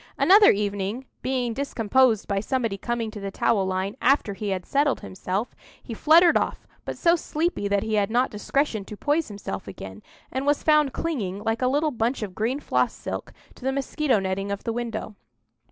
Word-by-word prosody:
Another 405 Hz, +2 st, +7 dB
evening, 205 Hz, +4 st, -1 dB, 0.2 s
being 250 Hz, -3 st, -1 dB
discomposed 250 Hz, -3 st, +2 dB
by 200 Hz, -1 st, 0 dB
somebody 230 Hz, -1 st, -1 dB
coming 230 Hz, +2 st, -3 dB
to 215 Hz, -, -8 dB
the 200 Hz, 0 st, -4 dB
towel 195 Hz, 0 st, +1 dB
line 190 Hz, +2 st, -2 dB
after 260 Hz, -6 st, +3 dB
he 205 Hz, +1 st, -4 dB
had 185 Hz, -2 st, -2 dB
settled 285 Hz, 0 st, +1 dB
himself, 190 Hz, +4 st, -4 dB, 0.3 s
he 235 Hz, -, -7 dB
fluttered 330 Hz, +8 st, +5 dB
off; -, -, -1 dB, 0.2 s
but -, -, -5 dB
so 335 Hz, 0 st, +4 dB
sleepy 325 Hz, -, -2 dB
that 200 Hz, 0 st, +1 dB
he 220 Hz, -, -3 dB
had 205 Hz, -1 st, +2 dB
not 245 Hz, +3 st, +1 dB
discretion 220 Hz, +1 st, -1 dB
to 210 Hz, -, -9 dB
poise 295 Hz, +6 st, 0 dB
himself 200 Hz, -, -6 dB
again, 95 Hz, 0 st, -9 dB, 0.3 s
and 265 Hz, +2 st, -3 dB
was 290 Hz, 0 st, +2 dB
found 300 Hz, -3 st, +4 dB
clinging, 210 Hz, -, -3 dB
like 225 Hz, +2 st, -1 dB
a 255 Hz, -, +3 dB
little 295 Hz, +4 st, +1 dB
bunch 235 Hz, 0 st, -1 dB
of 195 Hz, -3 st, -5 dB
green 230 Hz, +8 st, -1 dB
floss -, -, 0 dB
silk, -, -, -6 dB, 0.2 s
to -, -, -17 dB
the 265 Hz, -, +1 dB
mosquito 275 Hz, -1 st, 0 dB
netting 195 Hz, +1 st, -2 dB
of 200 Hz, -, -4 dB
the 230 Hz, -, -2 dB
window. 230 Hz, -2 st, -4 dB
230 Hz, 190 wpm, -25 LUFS, 200-275 Hz, 0.3 s, Another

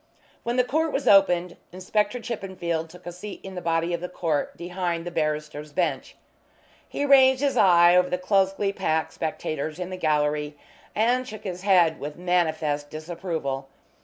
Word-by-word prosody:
When 235 Hz, +1 st, -2 dB
the 250 Hz, -, +5 dB
court 315 Hz, +5 st, 0 dB
was 275 Hz, -, -2 dB
opened 180 Hz, -3 st, +4 dB
Inspector 205 Hz, +5 st, -1 dB
Chippenfield 180 Hz, -8 st, -4 dB
took 180 Hz, +1 st, -15 dB
a 175 Hz, -, -5 dB
seat 190 Hz, +4 st, -8 dB
in 190 Hz, -, -8 dB
the 180 Hz, -, -5 dB
body 165 Hz, +1 st, 0 dB
of 170 Hz, -, -2 dB
the 180 Hz, -, -4 dB
court 160 Hz, -5 st, -2 dB
behind 175 Hz, -1 st, -3 dB
the 175 Hz, -, -5 dB
barrister's 150 Hz, -2 st, -3 dB
bench. 155 Hz, -7 st, -1 dB, 0.7 s
He 285 Hz, -, -2 dB
ranged 265 Hz, -1 st, +6 dB
his 280 Hz, -, +1 dB
eye 175 Hz, -2 st, +6 dB
over 180 Hz, 0 st, +4 dB
the 180 Hz, -, 0 dB
closely 195 Hz, +1 st, +1 dB
packed 160 Hz, -5 st, -1 dB
spectators 155 Hz, -1 st, -4 dB
in 180 Hz, 0 st, -5 dB
the 185 Hz, -, -5 dB
gallery, 150 Hz, -2 st, 0 dB, 0.4 s
and 245 Hz, +4 st, +2 dB
shook 215 Hz, -2 st, -9 dB
his 180 Hz, -2 st, -5 dB
head 180 Hz, -5 st, +3 dB
with 150 Hz, +1 st, -6 dB
manifest 160 Hz, -5 st, 0 dB
disapproval. 155 Hz, -4 st, -4 dB
175 Hz, 165 wpm, -25 LUFS, 160-195 Hz, 0.7 s, ranged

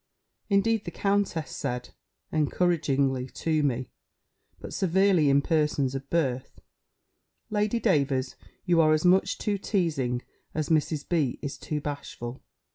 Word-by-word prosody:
Indeed 210 Hz, +2 st, +2 dB
the -, -, -3 dB
countess 195 Hz, -5 st, 0 dB
said, 125 Hz, -3 st, -3 dB, 0.4 s
encouragingly 140 Hz, -5 st, +1 dB
to 160 Hz, -2 st, 0 dB
me, 130 Hz, -3 st, -1 dB, 0.7 s
but -, -, -8 dB
severely 190 Hz, -4 st, +3 dB
in 140 Hz, +1 st, +4 dB
persons 150 Hz, -4 st, +1 dB
of 135 Hz, 0 st, -6 dB
birth, 135 Hz, -6 st, -1 dB, 0.9 s
"Lady 210 Hz, +2 st, +1 dB
Davers, 140 Hz, -, +1 dB, 0.3 s
you 175 Hz, -3 st, +4 dB
are 155 Hz, -1 st, +5 dB
as 155 Hz, +2 st, +1 dB
much 185 Hz, +2 st, +4 dB
too 205 Hz, -2 st, -1 dB
teazing, 150 Hz, -, -1 dB, 0.3 s
as 155 Hz, -2 st, -1 dB
Mrs. 155 Hz, -2 st, +1 dB
B. 155 Hz, -8 st, +1 dB
is 140 Hz, -, -3 dB
too 150 Hz, -, -4 dB
bashful. 140 Hz, -4 st, -6 dB
155 Hz, 125 wpm, -27 LUFS, 135-180 Hz, 0.9 s, are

